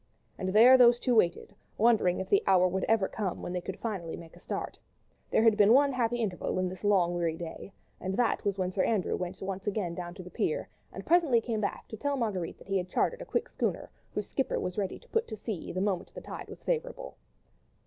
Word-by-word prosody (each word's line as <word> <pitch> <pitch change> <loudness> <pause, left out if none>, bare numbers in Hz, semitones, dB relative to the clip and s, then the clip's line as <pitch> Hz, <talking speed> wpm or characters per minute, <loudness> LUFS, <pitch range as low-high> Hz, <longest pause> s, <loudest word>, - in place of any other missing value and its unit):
And 185 - -3
there 240 +6 +7
those 240 -1 +7
two 250 - +1
waited, 180 -3 +2 0.2
wondering 215 -5 +3
if 190 - -4
the 200 - +4
hour 185 -2 +5
would 190 +1 -1
ever 220 -4 +2
come 200 -5 -4
when 175 - -4
they 180 - -2
could 190 +1 -6
finally 190 -8 -4
make 165 -1 -12
a - - -15
start. - - -5 0.5
There - - +3
had 225 -2 +5
been 210 +1 +6
one 280 +1 +5
happy 240 -1 0
interval 205 -7 -2
in 185 0 +1
this 185 +2 -10
long 190 -4 +3
weary 170 -2 -1
day, 170 +3 -7 0.3
and 190 +1 -3
that 245 - +1
was 200 -2 -1
when 185 -1 -1
Sir 185 0 0
Andrew 215 -5 +1
went 180 0 -5
down - - -6
once 195 0 -5
again 195 -5 -1 0.2
to 185 - -8
the 180 - -11
pier, - - -1 0.2
and - - -8
presently 325 -8 +4
came 225 -2 -3
back 200 - -3
to 220 - -7
tell 285 +4 -1
Marguerite 200 -9 -2
that - - -16
he 195 0 +1
had 180 0 -5
chartered - - 0
a - - -6
quick 480 - -1
schooner, - - -3 0.2
whose - - -2
skipper 270 - -1
was 180 - -3
ready 200 -3 -2
to 485 - -20
put 450 0 0
to 220 - -6
sea 210 -4 -5
the 185 - -2
moment 195 -3 -1
the - - -7
tide - - -8
was - - -11
favourable. - - -3
200 Hz, 240 wpm, -29 LUFS, 185-235 Hz, 0.5 s, there